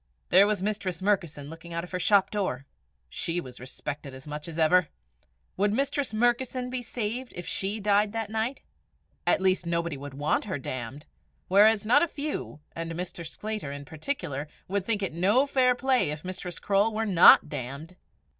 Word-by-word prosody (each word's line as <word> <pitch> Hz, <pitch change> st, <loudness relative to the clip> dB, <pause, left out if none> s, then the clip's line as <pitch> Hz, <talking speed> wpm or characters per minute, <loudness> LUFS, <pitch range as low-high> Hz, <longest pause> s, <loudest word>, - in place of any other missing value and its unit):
There 195 Hz, +3 st, +7 dB
was 210 Hz, -3 st, 0 dB
Mistress 200 Hz, -4 st, -2 dB
Murkison 175 Hz, -8 st, -1 dB
looking 165 Hz, +2 st, -10 dB
out 170 Hz, -, -2 dB
of 180 Hz, -, -10 dB
her 180 Hz, -, -2 dB
shop 200 Hz, +1 st, +4 dB
door! 185 Hz, -11 st, -2 dB, 0.4 s
She 165 Hz, -, -2 dB
was 125 Hz, -6 st, -9 dB
respected 135 Hz, +2 st, -6 dB
as 130 Hz, +2 st, -11 dB
much 150 Hz, +1 st, -6 dB
as 165 Hz, -1 st, -7 dB
ever! 170 Hz, +1 st, +4 dB, 0.7 s
Would 205 Hz, +2 st, +2 dB
Mistress 275 Hz, +1 st, 0 dB
Murkison 245 Hz, +2 st, 0 dB
be 255 Hz, -1 st, -2 dB
saved 240 Hz, +2 st, -4 dB
if 175 Hz, -, -6 dB
she 200 Hz, +3 st, -2 dB
died 205 Hz, 0 st, +2 dB
that 225 Hz, -1 st, -4 dB
night? 225 Hz, +5 st, -2 dB, 0.6 s
At -, -, +4 dB
least 185 Hz, -2 st, +2 dB
nobody 170 Hz, -3 st, -1 dB
would 140 Hz, 0 st, -8 dB
want 145 Hz, +7 st, 0 dB
her 190 Hz, -6 st, -3 dB
damned; 130 Hz, +2 st, -6 dB, 0.4 s
whereas 210 Hz, +2 st, +5 dB
not 230 Hz, -, +5 dB
a 340 Hz, -, +3 dB
few, 290 Hz, -, -5 dB
and 165 Hz, 0 st, -4 dB
Mr. 175 Hz, 0 st, -5 dB
Sclater 210 Hz, -1 st, -5 dB
in 140 Hz, 0 st, -7 dB
particular, 150 Hz, -, -4 dB, 0.2 s
would 195 Hz, 0 st, -2 dB
think 210 Hz, -3 st, +1 dB
it 190 Hz, -, -2 dB
no 200 Hz, -, +3 dB
fair 255 Hz, -3 st, +3 dB
play 260 Hz, -, +2 dB
if 150 Hz, +3 st, -5 dB
Mistress 185 Hz, -2 st, -5 dB
Croale 200 Hz, +2 st, +2 dB
were 220 Hz, +1 st, 0 dB
not 180 Hz, -5 st, +8 dB
damned! 140 Hz, +6 st, -6 dB
185 Hz, 180 wpm, -27 LUFS, 155-220 Hz, 0.7 s, not